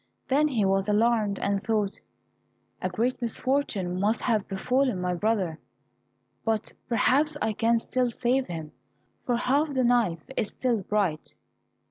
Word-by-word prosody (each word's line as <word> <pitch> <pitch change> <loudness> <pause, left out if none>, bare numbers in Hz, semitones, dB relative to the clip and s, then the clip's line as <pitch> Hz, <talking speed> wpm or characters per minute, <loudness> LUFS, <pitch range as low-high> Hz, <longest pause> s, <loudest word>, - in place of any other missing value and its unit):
Then 290 +3 +4
he 230 -8 +1
was 195 +1 +1
alarmed 215 -1 +2
and 200 0 0
thought, 210 -3 -1 0.8
"A 185 - -1
great 235 +8 -1
misfortune 230 -7 -1
must 210 +4 +1
have 220 -5 0
befallen 250 +3 0
my 180 0 -1
brother, 185 -4 0 0.8
but 220 -1 -1 0.2
perhaps 280 +6 +3
I 220 -3 0
can 230 +2 +2
still 250 +2 0
save 250 +3 0
him, 160 -3 -6 0.6
for 245 - +2
half 280 +5 +1
the 260 -1 +1
knife 230 -10 +2
is 210 - -1
still 240 -5 -1
bright." 190 -6 -1
220 Hz, 140 wpm, -27 LUFS, 195-250 Hz, 0.8 s, Then